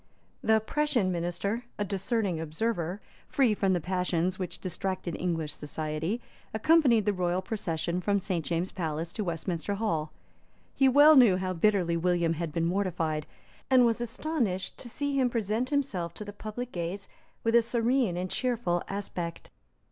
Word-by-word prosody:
The 220 0 +4
Prussian 240 -4 +1
Minister, 175 +7 -2
a 205 - -1
discerning 195 -2 -1
observer, 170 +3 -2 0.3
free 255 -6 +3
from 195 -2 +1
the 180 - +1
passions 180 +1 -1
which 185 - -4
distracted 185 -2 -3
English 165 -4 -2
society, 155 +7 -3 0.4
accompanied 245 -3 +4
the 210 - +2
royal 180 0 0
procession 175 -4 -2
from 200 +2 +2
St. 185 -4 -2
James's 170 +3 -1
Palace 165 -1 -3
to 215 - -2
Westminster 170 +2 -2
Hall. 165 -8 -1 0.6
He 270 -1 +4
well 290 +4 +8
knew 235 -9 +7
how 185 0 -2
bitterly 180 -2 +2
William 170 -1 +2
had 165 -1 -3
been 165 +1 0
mortified, 170 -5 -1 0.4
and 255 -2 +6
was 230 0 +1
astonished 240 - -2
to 240 - -8
see 285 +4 -2
him 255 -2 +3
present 230 +2 -1
himself 195 - -1
to 210 - -6
the 205 - -7
public 215 +4 -6
gaze 175 +3 -4 0.4
with 230 - +1
a 235 - +7
serene 235 -3 +1
and 180 +1 -3
cheerful 230 -9 0
aspect. 180 -4 -4
190 Hz, 155 wpm, -29 LUFS, 170-230 Hz, 0.6 s, well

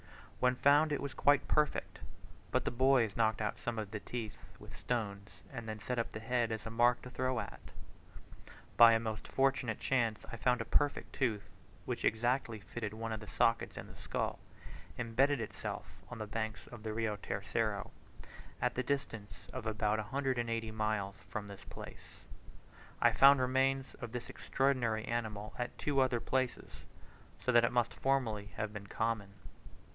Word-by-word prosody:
When 125 0 +3
found 145 +4 +5
it 145 - +1
was 140 -1 -4
quite 145 -1 +4
perfect; 150 -1 +1 0.5
but - - +1
the - - 0
boys 125 -3 +3
knocked 110 -1 +2
out 105 -1 -2
some 120 -1 -3
of 105 -2 -4
the 105 - -3
teeth 115 -1 -5 0.2
with - - -12
stones, 105 -4 -3 0.2
and 115 -3 -5
then 110 0 -4
set 125 +3 -2
up 115 - -1
the - - -5
head 120 0 0
as 110 0 -4
a 115 - -4
mark 120 +1 +3
to 125 - -8
throw 130 -1 0
at. 100 - -6 1.2
By 115 -1 +10
a 115 - +4
most 110 -1 -4
fortunate 135 -4 +1
chance 115 -5 +1
I 120 - -5
found 125 +2 +2
a 115 - -2
perfect 145 +4 +1
tooth, 115 -6 0 0.4
which - - -3
exactly 120 0 +1
fitted 110 +1 -5
one 115 0 -4
of 110 - -3
the 105 - -10
sockets 115 +3 +1
in - - -5
this - - -14
skull, - - -2 0.6
embedded 130 +5 +2
by 115 - -2
itself - - -5 0.2
on 120 - -6
the 110 - -4
banks 110 -1 -3
of 120 -2 -9
the 110 0 -3
Rio 110 -1 -1
Tercero, 100 +1 -2 0.7
at - - +1
the 130 - 0
distance 120 -6 -3
of 110 - -4
about 110 0 +1
180 120 -2 -1
miles 110 -2 -1
from 105 -1 -4
this 100 -1 -10
place. - - -11 0.8
I - - +6
found 140 0 +7
remains 135 +1 +1
of 120 -2 -5
this 125 0 -5
extraordinary 125 -5 +1
animal 110 -3 -3
at 125 - -3
two 145 -2 +1
other 130 -2 +2
places, 130 +1 -2 0.7
so 125 - +4
that 120 -1 +6
it 120 - +3
must 120 -2 +1
formerly 115 -7 0
have 105 -1 -2
been 100 -2 -7
common. 110 -3 -1
115 Hz, 175 wpm, -34 LUFS, 110-130 Hz, 1.2 s, By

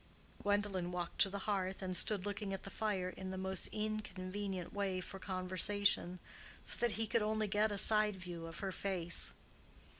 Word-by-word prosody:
Gwendolen 205 -3 +1
walked 175 -1 -4
to 195 - +7
the 200 - -4
hearth 195 -2 -1
and 185 -1 -2
stood 200 +1 +3
looking 205 -1 -2
at 190 - -9
the 195 - -7
fire 200 -4 -1
in 190 0 -6
the 190 - -4
most 190 0 +1
inconvenient 200 -3 -3
way 195 -2 0
for 195 +1 -7
conversation, 185 0 +2 0.5
so - - +3
that 240 -2 +2
he 225 - 0
could 225 +1 +2
only 215 0 +1
get 210 +2 +2
a 205 - -2
side 210 0 +5
view 175 -3 -6
of 165 - -8
her 190 - -1
face. 180 -3 0
195 Hz, 180 wpm, -37 LUFS, 185-205 Hz, 0.5 s, to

